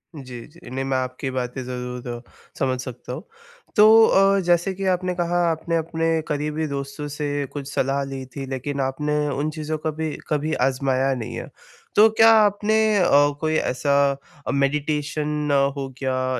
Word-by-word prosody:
जी, 125 -4 -8
जी। 170 +3 -15
नहीं 135 +2 -3
मैं 135 -1 0
आपकी 130 +1 -3
बातें 130 0 -3
ज़रूर 125 0 -5
द 120 -1 -5 0.4
समझ 130 -1 0
सकता 125 0 -7
हूँ। - - -7 0.5
तो 220 +1 +8
अ, 195 0 +4
जैसे 175 +2 +2
कि 195 +1 -5
आपने 185 0 0
कहा 175 0 0
आपने 165 +1 -2
अपने 165 0 0
करीबी 150 +1 -2
दोस्तों 140 +1 -5
से 145 0 -4 0.2
कुछ 140 -2 -5
सलाह 140 +1 0
ली 135 -1 -5
थी 140 -2 -4
लेकिन 135 +1 -3
आपने 150 +3 -1
उन 145 +2 -1
चीज़ों 155 0 -4
को 155 +1 -2
कभी, 155 0 -4
कभी 150 +1 0
आज़माया 135 0 +1
नहीं 115 -3 -6
है। - - -6 0.5
तो 215 +2 +7
क्या 225 +1 +6
आपने 210 +1 +2 0.2
अ, 175 - +3 0.3
कोई 155 0 0
ऐसा 140 -1 +1 0.5
अ, - - 0
मेडिटेशन 150 +1 -1 0.3
हो 135 -1 -3
गया 130 -1 -1
150 Hz, 170 wpm, -23 LUFS, 130-165 Hz, 0.5 s, तो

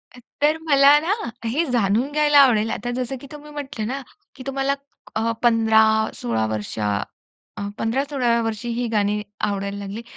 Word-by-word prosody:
अ, - - -12 0.2
तर 305 +2 +3
मला 280 +1 +7
ना 345 +6 0 0.3
हे 295 +9 +1
जाणून 230 +4 +1
घ्यायला 295 -1 +4
आवडेल, 225 -5 +5
आता 245 +3 -3
जसं 255 +1 -3
की 275 - -10
तुम्ही 300 0 -11
म्हटलं 270 -7 -5
ना, 270 +2 -3 0.3
की 255 - -10
तुम्हाला 275 0 0 0.4
अ, 225 +1 +1
15-16 220 - +3
वर्ष 110 0 -4
अ, 105 -1 -3 0.5
15-16व्या 245 -1 0
वर्षी 225 +1 -3
ही 240 +1 -1
गाणी 210 -1 0 0.3
आवडायला 200 0 -3
लागली. 200 +3 -6
235 Hz, 155 wpm, -22 LUFS, 210-275 Hz, 0.5 s, मला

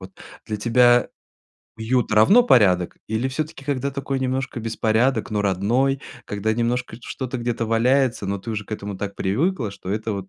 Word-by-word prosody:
Вот 95 +1 -10 0.4
для 105 - -3
тебя 120 +2 +4 0.7
уют 115 +1 0
равно 110 - +6
порядок? 95 - +3
Или 110 +4 -1
всё-таки, 145 0 -5
когда 140 -1 -1
такой 135 -1 -3
немножко 130 -1 -2
беспорядок, 115 +3 0
но 105 -1 0
родной, 120 +8 +1 0.3
когда 105 +2 -1
немножко 120 +2 -1
что-то 130 -1 -5
где-то 120 -1 -2
валяется, 120 0 +2
но 100 +1 -2
ты 115 +4 -7
уже 105 -2 -3
к - - -20
этому 100 -2 -5
так 100 0 -5
привыкла, 125 - 0
что 95 - -8
это 110 +1 -2
вот 95 -1 -5
115 Hz, 170 wpm, -22 LUFS, 105-130 Hz, 0.7 s, равно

